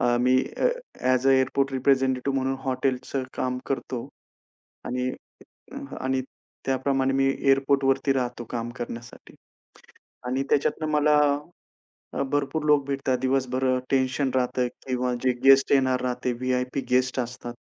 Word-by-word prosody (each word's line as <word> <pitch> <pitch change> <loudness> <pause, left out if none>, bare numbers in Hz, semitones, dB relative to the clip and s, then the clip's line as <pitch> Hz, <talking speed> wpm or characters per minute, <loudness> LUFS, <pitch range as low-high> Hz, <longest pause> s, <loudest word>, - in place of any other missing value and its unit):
A, 120 0 +3
me 125 +1 +4 0.2
a, - - +2 0.3
as 130 +1 +2
a - - +6
airport 135 +1 +2
representative 135 0 +1
म्हणून 135 0 -1
हॉटेलचं 130 0 -1
काम 125 0 -1
करतो 130 -3 -3 0.8
आणि 125 +1 -2 0.6
अ, - - -8 0.2
आणि 130 0 0 0.4
त्याप्रमाणे 135 0 +1
मी 135 0 +3
एअरपोर्टवरती 135 0 +2
राहतो 125 -2 -2
काम 120 -1 -3
करण्यासाठी 120 0 -8 0.9
आणि 130 +2 0
त्याच्यातनं 155 +2 +1
मला 150 0 +3 1.0
अ, - - -2
भरपूर 145 +2 -1
लोक 145 -2 +4
भेटतात. 135 -2 0
दिवसभर 130 0 0 0.2
टेन्शन 130 0 +1
राहतंय 125 0 +1 0.2
किंवा 125 -1 0
जे 130 - +4
गेस्ट 135 0 +6
येणार 130 -2 +3
राहते, 125 0 -1
व्हि-आय-पी 125 +2 -1
गेस्ट 130 +1 +2
असतात. 120 0 -5
130 Hz, 130 wpm, -25 LUFS, 125-135 Hz, 1.0 s, अ